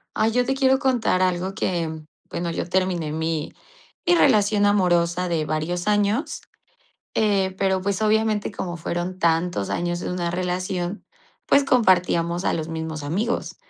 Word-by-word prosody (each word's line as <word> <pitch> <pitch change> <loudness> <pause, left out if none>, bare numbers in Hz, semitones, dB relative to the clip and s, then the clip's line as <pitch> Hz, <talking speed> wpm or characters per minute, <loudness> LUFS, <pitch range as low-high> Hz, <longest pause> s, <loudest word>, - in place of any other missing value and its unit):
Ay, 220 - +2
yo 245 +2 +2
te 270 +1 0
quiero 265 0 +3
contar 245 -9 +1
algo 185 +1 0
que, 165 -6 -2 0.3
bueno, 170 0 -3
yo 165 - -3
terminé 180 -4 0
mi 160 -1 -2 0.5
mi 350 - +5
relación 205 -8 +4
amorosa 180 -3 +2
de 160 -2 0
varios 160 +4 -2
años, 210 +8 +1 0.7
eh, 195 -3 +1
pero, 190 -1 +1
pues, 200 0 -1
obviamente, 215 -1 +1
como 175 -3 -5
fueron 175 +2 -4
tantos 165 - +1
años 175 0 -1
de - - -4
una 175 -1 -2
relación, 180 +1 -3 0.4
pues, 280 - +4
compartíamos 180 -8 +2
a - - +2
los 160 -1 -3
mismos 160 -1 -5
amigos. 200 +12 -2
185 Hz, 150 wpm, -23 LUFS, 170-210 Hz, 0.7 s, mi